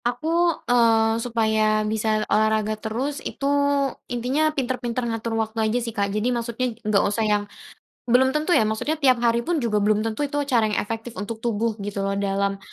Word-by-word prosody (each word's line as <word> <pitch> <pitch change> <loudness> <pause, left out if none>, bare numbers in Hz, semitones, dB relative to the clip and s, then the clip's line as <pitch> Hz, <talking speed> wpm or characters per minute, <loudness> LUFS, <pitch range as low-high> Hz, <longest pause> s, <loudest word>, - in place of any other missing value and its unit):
Aku, 245 +6 -2 0.4
eee, 225 -2 +3
supaya 220 -2 +1
bisa 215 0 0
olahraga 215 0 +2
terus 255 +7 -3
itu, 275 - -5 0.6
intinya 255 +6 +1
pinter-pinter 250 -4 -2
ngatur 225 0 -3
waktu 220 0 -2
aja 230 - 0
sih, 235 -2 -3
Kak. 200 -2 -1
Jadi, 215 +5 0
maksudnya 235 +1 -2
nggak 210 -3 +2
usah 210 +2 0
yang 210 -1 +1 0.6
belum 260 +3 +3
tentu 305 +4 0
ya, 220 -10 +4
maksudnya 290 +9 -2
tiap 265 -4 +5
hari 235 0 +3
pun 335 -6 0
juga 210 -3 +1
belum 210 +1 +2
tentu 225 +6 -2
itu 285 - -7
cara 240 -6 +2
yang 210 - -2
efektif 225 +2 -4
untuk 220 +2 -5
tubuh, 230 0 0
gitu 200 0 -4
loh 195 0 -1
dalam, 200 0 -1
225 Hz, 180 wpm, -23 LUFS, 215-245 Hz, 0.6 s, tiap